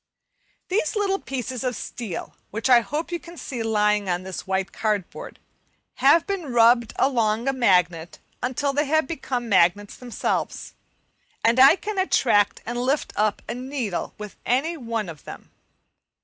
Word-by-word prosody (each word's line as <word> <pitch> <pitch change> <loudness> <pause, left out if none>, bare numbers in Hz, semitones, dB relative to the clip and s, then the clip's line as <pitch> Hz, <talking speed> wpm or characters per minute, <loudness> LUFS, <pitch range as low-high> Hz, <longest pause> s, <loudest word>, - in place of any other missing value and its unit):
These 375 -3 0
little 395 -2 0
pieces 260 -1 -5
of 250 -2 -1
steel, 210 -3 -6 0.2
which 225 +5 -1
I 245 - +9
hope 300 +8 -4
you 345 - -2
can 340 +1 -13
see 250 -6 -5
lying 210 -2 +1
on 175 +1 -1
this 190 -1 -7
white 190 0 -1
cardboard, 210 -5 -3 0.6
have 285 +6 +5
been 375 -9 -4
rubbed 235 -1 +4
along 230 -3 +1
a 270 - +2
magnet 180 -8 +1 0.2
until 270 +3 -1
they 295 +2 +1
have 315 +1 +2
become 255 -5 -4
magnets 200 0 +2
themselves, 245 -2 -3 0.7
and 230 +3 +4
I 265 +1 +9
can 415 0 -4
attract 220 - +2
and 240 +1 -3
lift 270 +4 -1
up 210 0 0
a - - -3
needle 250 -6 -4
with 210 -1 -9
any 280 +8 0
one 230 - -3
of 160 -3 -10
them. - - -10
240 Hz, 155 wpm, -24 LUFS, 210-275 Hz, 0.7 s, I